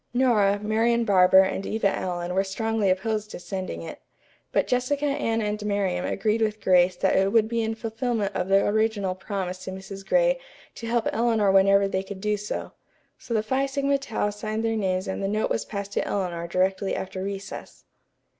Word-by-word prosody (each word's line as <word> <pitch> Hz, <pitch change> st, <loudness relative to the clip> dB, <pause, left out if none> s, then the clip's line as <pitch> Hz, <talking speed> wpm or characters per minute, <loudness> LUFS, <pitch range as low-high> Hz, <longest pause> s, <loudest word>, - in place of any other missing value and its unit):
Nora, 215 Hz, -6 st, +3 dB
Marian 225 Hz, +3 st, +1 dB
Barber 190 Hz, -1 st, +6 dB
and 190 Hz, 0 st, -2 dB
Eva 215 Hz, 0 st, 0 dB
Allen 175 Hz, -1 st, -3 dB
were 190 Hz, +1 st, +2 dB
strongly 220 Hz, +1 st, -1 dB
opposed 210 Hz, +3 st, -1 dB
to -, -, -8 dB
sending 185 Hz, -, -5 dB
it. -, -, -9 dB, 0.5 s
But -, -, +2 dB
Jessica, 255 Hz, +4 st, 0 dB
Anne 255 Hz, -6 st, 0 dB
and 210 Hz, 0 st, -2 dB
Miriam 195 Hz, -4 st, -1 dB
agreed 215 Hz, +3 st, 0 dB
with 215 Hz, -1 st, 0 dB
Grace 180 Hz, -1 st, +4 dB
that 190 Hz, +2 st, +1 dB
it 195 Hz, +1 st, +3 dB
would 220 Hz, -1 st, +4 dB
be 230 Hz, 0 st, -1 dB
in 225 Hz, 0 st, -1 dB
fulfillment 225 Hz, -2 st, -2 dB
of 180 Hz, -, -1 dB
the 195 Hz, 0 st, +4 dB
original 210 Hz, -3 st, +1 dB
promise 185 Hz, -1 st, -4 dB
to -, -, -5 dB
Mrs. 190 Hz, +1 st, -8 dB
Gray -, -, +2 dB, 0.3 s
to 230 Hz, -, -7 dB
help 235 Hz, 0 st, +1 dB
Eleanor 225 Hz, -3 st, +2 dB
whenever 195 Hz, +1 st, +5 dB
they 190 Hz, -1 st, -1 dB
could 195 Hz, 0 st, -8 dB
do 210 Hz, +1 st, 0 dB
so. 205 Hz, 0 st, -5 dB, 0.5 s
So 235 Hz, -, -4 dB
the 215 Hz, -, +1 dB
Phi 265 Hz, +5 st, 0 dB
Sigma 275 Hz, 0 st, 0 dB
Tau 220 Hz, -6 st, -2 dB
signed 215 Hz, +2 st, -3 dB
their 225 Hz, 0 st, +1 dB
names 190 Hz, -3 st, -1 dB
and 190 Hz, -, -3 dB
the 195 Hz, -, 0 dB
note 215 Hz, +2 st, -1 dB
was -, -, -1 dB
passed 200 Hz, -1 st, -5 dB
to -, -, -1 dB
Eleanor 175 Hz, -4 st, -2 dB
directly 190 Hz, +2 st, 0 dB
after 190 Hz, 0 st, -5 dB
recess. 195 Hz, 0 st, -7 dB
205 Hz, 190 wpm, -25 LUFS, 190-225 Hz, 0.5 s, Barber